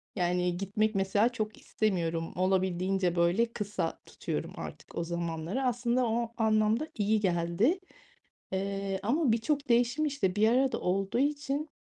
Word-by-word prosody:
yani, 180 -1 +1
gitmek 210 +3 0
mesela 195 +4 +3
çok 215 -3 -4
istemiyorum. 170 -6 -1
Olabildiğince, 185 -1 +1
böyle, 170 +6 +3
kısa 205 0 -3
tutuyorum - - -4
artık - - -8
o 170 - 0
zamanları. 170 +6 -3
Aslında 245 0 +1
o 230 0 -1
anlamda 220 +5 +2
iyi 215 +1 +2
geldi, 185 - +1 0.7
eee, 195 0 -2
ama 265 +5 +2
birçok 280 +5 0
değişim, 240 +5 +3
işte, 240 -11 0
bir 215 +1 +4
arada 260 +2 +2
olduğu 195 +5 0
için, 290 +1 -1
210 Hz, 130 wpm, -30 LUFS, 185-240 Hz, 0.7 s, bir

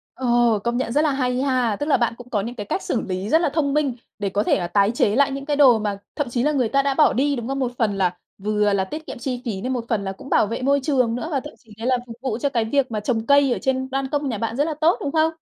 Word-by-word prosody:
Ồ, 240 -3 +2
công 235 0 0
nhận 255 -2 -2
rất 290 - +3
là 310 -1 +2
hay 255 -2 0
ha. 255 -5 +1
Tức 290 - -3
là 300 - +3
bạn 235 -2 0
cũng 245 0 -12
có 210 -4 0
những 235 +4 -6
cái 210 -4 -6
cách 380 - -2
xử 230 - -1
lý 190 +2 -4
rất 320 +5 +4
là 340 - +2
thông 280 -1 0
minh, 285 -4 +1 0.2
để 200 -1 -1
có 200 +2 0
thể - - +2
là 175 - -2
tái 200 +3 +2
chế 220 -3 +1
lại 280 +1 +3
những 275 0 -5
cái 295 -1 0
đồ 255 -6 +6
mà 205 -2 -2 0.2
thậm 290 -4 -2
chí 240 0 -1
là 300 - +2
người 255 -6 +1
ta 275 +3 +2
đã 280 0 +1
bỏ 300 +2 +4
đi, 285 +2 +1
đúng 235 -3 -5
không? 270 +1 -2
Một 255 -2 -1
phần 215 -4 +1
là, 180 -2 0 0.2
vừa 210 0 +1
là 195 -1 +1
tiết 310 +11 -7
kiệm - - -6
chi 250 0 -3
phí 205 -5 -3
này, 250 - -3
một 245 -3 -2
phần 215 -4 0
là 195 - -3
cũng 195 +8 -11
bảo 215 - +3
vệ 230 +4 -4
môi 280 +2 +3
trường 255 -5 +1
nữa, 250 - -4
và 280 - +1
thậm 295 +3 -10
chí 225 -4 -18
đấy 225 +2 -4
là 255 -1 +3
phục 230 - -8
vụ 255 -5 -2
cho 280 +4 0
cái 235 -5 0
việc 260 +2 0
mà 215 - -1
trồng 225 +1 -1
cây 280 -1 +4
ở - - -4
trên 260 0 -1
ban 270 0 -2
công 290 -1 -1
nhà 230 - -2
bạn 225 +2 -3
rất 285 - +3
là 315 +1 -2
tốt, 330 +3 +4
đúng 280 - -2
không? 315 +1 +2
250 Hz, 330 wpm, -22 LUFS, 220-280 Hz, 0.2 s, đồ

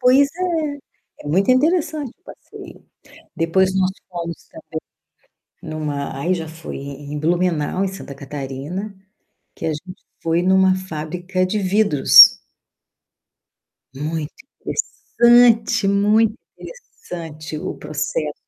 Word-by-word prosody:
pois 265 +3 +5 0.7
é. - - -20
É - - -6
muito 190 +9 +1
interessante 305 0 +1
o - - -45
passeio. - - -13 0.5
Depois 185 +3 +1
nós 190 0 +2 0.2
fomos 170 -2 -6
também - - -8 0.8
em 155 - -7
uma 145 -3 -4
aí 175 +6 0
já 165 -3 -4
foi 160 +1 -9
em 140 +1 -7
Blumenau, 175 +1 0
em - - 0
Santa 190 -7 -9
Catarina, 145 +8 -6 0.6
que - - -6
a - - +1
gente 180 +5 -8 0.2
foi 165 +1 +1
em 180 +1 +1
uma 190 0 +4
fábrica 180 +1 -3
de 205 +3 -2
vidros. 190 -6 +7 1.6
Muito 150 +2 -4 0.3
interessante, 235 - +3
muito 210 +2 +3 0.2
interessante 165 - -9
o - - -5
processo. 150 0 -3
180 Hz, 115 wpm, -20 LUFS, 155-200 Hz, 1.6 s, vidros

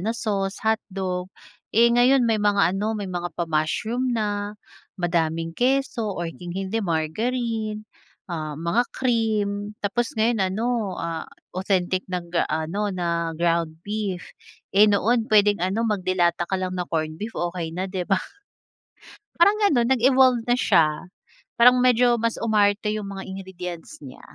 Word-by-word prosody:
na 225 +5 -2
sauce, 195 -3 -2
hotdog. 190 -4 -1 0.4
Eh 235 +2 +4
ngayon 250 +2 +4
may 225 -2 +1
mga 200 -4 +3
ano 210 +3 -1
may 205 - -4
mga 175 0 -2
pa 175 - 0
mushroom 170 +11 -1
na, 205 -1 -2 0.4
madaming 165 -2 -1
keso, 245 -3 0
or 170 -1 -3
kung 175 +1 -10
hindi 195 +3 -2
margarine, 215 +6 -2 0.4
ah, 155 -4 -5
mga 170 +10 0
cream. 210 -4 -1
Tapos 230 +4 -1
ngayon 225 0 +2
ano, 215 -1 -1
ah, 165 -1 -4 0.2
authentic 185 -1 -1
ng 175 -2 -5
gaano 160 +7 -1
na 170 -3 -2
ground 170 -1 -1
beef. 205 -3 -4 0.4
Eh 210 +2 +6
noon 225 +3 +2
puwedeng 205 -3 +4
ano, 190 +6 0
mag 210 -3 0
de 185 0 -1
lata 175 -1 +1
ka 190 - 0
lang 185 0 -3
na 180 -1 -3
corned 155 -1 -2
beef, 220 +2 -5
okey 175 -1 -2
na, 185 - -1
'di 185 -1 -4
ba. 195 - +4 1.2
Parang 400 +5 +4
gano'n, 265 - +3
nag-evolve 255 -1 +4
na 245 - +4
siya. 170 -6 +2 0.4
Parang 250 +2 +6
medyo 245 -1 +4
mas 230 0 0
umarte 210 -1 +2
'yung 210 -2 -4
mga 195 -1 -6
ingredients 180 -3 -7
niya. 130 - -11
200 Hz, 150 wpm, -24 LUFS, 175-225 Hz, 1.2 s, Eh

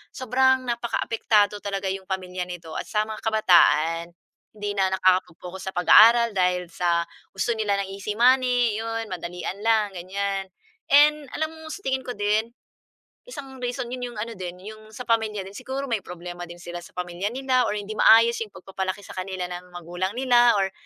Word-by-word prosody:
sobrang 260 +1 +2
nakakaapektado 230 -3 0
talaga 195 -1 -3
'yong 190 0 -6
pamilya 185 -1 -4
nito 175 -2 -8
at - - -7
sa 210 0 0
mga 215 0 -7
kabataan, 170 -6 +3 0.4
hindi 205 -1 -3
na 190 0 +2
nakakapag-focus 185 0 0
sa - - -9
pag-aaral 230 +6 +7
dahil 180 -2 0
sa 170 -1 +1 0.3
gusto 195 +5 0
nila 215 -3 0
ng 195 - -8
easy 200 +2 -5
money. 245 -2 +3
'Yon 225 -1 -4
madalian 180 +2 -5
lang 215 -1 +2
ganiyan, 195 +2 -3 0.4
and 295 +1 +5
alam 315 0 -2
mo 320 0 -12
sa 395 - -8
tingin 265 0 0
ko 250 - -4
din, 210 +2 +1 0.8
isang 270 - -9
reason 245 0 -3
'yon 255 - -5
'yong - - -12
ano 230 +1 -5
din, 180 -1 -6
'yong 215 +1 -11
sa 250 - -7
pamilya 220 -4 0
din. 195 - -11
Siguro 265 +3 -4
may 230 -4 -1
problema 175 0 -8
din 175 - -10
sila 175 0 -7
sa - - -14
pamilya 180 +2 -3
nila 255 -1 +1
or - - -2
hindi 205 +1 -5
maayos 230 +1 +6
'yong 225 - -4
pagpapalaki 190 +1 -5
sa - - -10
kanila 185 -1 -4
ng 180 0 -8
magulang 175 +2 -4
nila 245 -2 +5
or 195 0 0
205 Hz, 180 wpm, -24 LUFS, 185-235 Hz, 0.8 s, pag-aaral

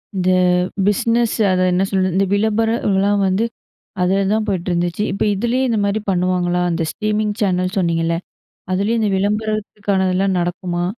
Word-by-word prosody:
இந்த 185 -1 +1 0.6
பிஸ்னஸ் 230 +3 +1 0.2
அத 185 0 +1
என்ன 180 +2 +2
சொல்றது. 185 -1 +1
இந்த 195 - +3
விளம்பர 220 +2 +1 0.2
அதுலாம் 200 +1 +2
வந்து, 190 +4 +1 0.6
அதில 195 +2 +2
தான் 220 0 0
போயிட்டுருந்துச்சு. 175 -1 -1
இப்ப 195 - -1
இதுலயும் 240 +6 0
இந்த 225 -2 +1
மாரி 200 +2 -1
பண்ணுவாங்களா? 180 -1 0
அந்த 165 0 -1
ஸ்ட்ரீமிங் 215 -1 -1
சேனல் 185 -2 0
சொன்னீங்கல்ல. 165 -2 +1 0.6
அதுலயும் 205 +5 0
இந்த 215 -2 +1
விளம்பரத்துக்கானதெல்லாம் 200 -2 0
நடக்குமா? 175 0 -2
195 Hz, 135 wpm, -19 LUFS, 180-210 Hz, 0.6 s, இந்த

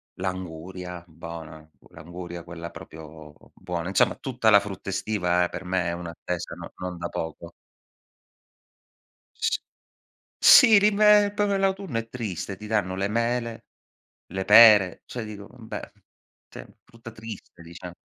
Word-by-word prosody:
l'anguria, 90 -1 -6
bona, 80 -1 -10 0.2
l'anguria 85 0 -9
quella 85 -1 -8
proprio 80 -2 -12 0.2
buona 85 -1 -5
Insomma 95 - +2
tutta 125 -4 0
la 100 - +8
frutta 100 -1 -7
estiva 90 -3 0
per 90 - -7
me 90 -1 -1
è 85 - -1
un'attesa 85 0 -6
no 85 -1 -10
non 90 -1 -6
da 85 - -4
poco. 80 +1 -6 1.9
S - - 0 0.8
s - - -1
sì, 215 -2 +7
l'inve 210 0 +5
proprio 205 -1 +1
l'autunno 195 -9 -1
è 115 - -5
triste, 105 -6 -5
ti 105 - -10
danno 105 -4 -1
le 95 +1 -1
mele, 115 +1 -2 0.7
le 95 0 -3
pere, 105 -4 +7
cioè 120 -3 -6
dico 100 -2 -9
vabbè, 110 -2 -9 0.6
sì, - - -10 0.2
frutta 115 0 -13
triste, 110 -6 -11
diciam 85 +1 -10
95 Hz, 135 wpm, -25 LUFS, 85-115 Hz, 1.9 s, la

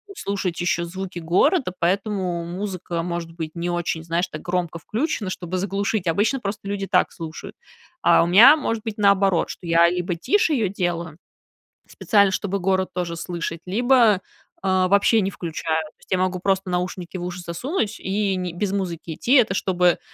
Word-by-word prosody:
слушать 195 - -3
еще 175 -1 0
звуки 185 +1 -6
города, 185 - +2
поэтому 185 -1 -1
музыка 180 -1 -4
может 170 -1 -4
быть 160 -2 -5
не 170 +1 -3
очень, 175 -2 -2
знаешь, 170 +2 -1
так 155 - -7
громко 175 -2 -2
включена, 220 - -2
чтобы 185 -1 -4
заглушить. 195 +1 -1
Обычно 210 +11 +1
просто 205 -2 -5
люди 195 -1 -3
так 180 -1 +2
слушают, 160 -1 -8 0.5
а - - +5
у - - 0
меня 225 - +9
может 230 -8 -2
быть 220 -2 -5
наоборот, 200 -3 +3
что - - -8
я 170 +1 +5
либо 180 0 -2
тише 390 - +2
ее 225 -8 +1
делаю 175 -4 -3 0.7
специально, 200 -4 +2
чтобы 200 +1 -2
город 190 0 +1
тоже 175 -2 -3
слышать, 170 -1 -5
либо, 230 -1 +4 0.4
а, 185 -1 +2
вообще 200 +3 +4
не 195 - 0
включаю. 160 -2 -2
То 155 - -14
есть - - -23
я 185 - +3
могу 185 0 0
просто 190 0 0
наушники 180 0 -3
в 175 - -5
уши 180 0 -5
засунуть 215 - -3
и 195 0 -1
не 180 -2 -3
без 190 +3 -2
музыки 175 -5 -3
идти, 240 - 0
это 230 -8 +5
чтобы 180 -2 +2
185 Hz, 175 wpm, -23 LUFS, 170-200 Hz, 0.7 s, меня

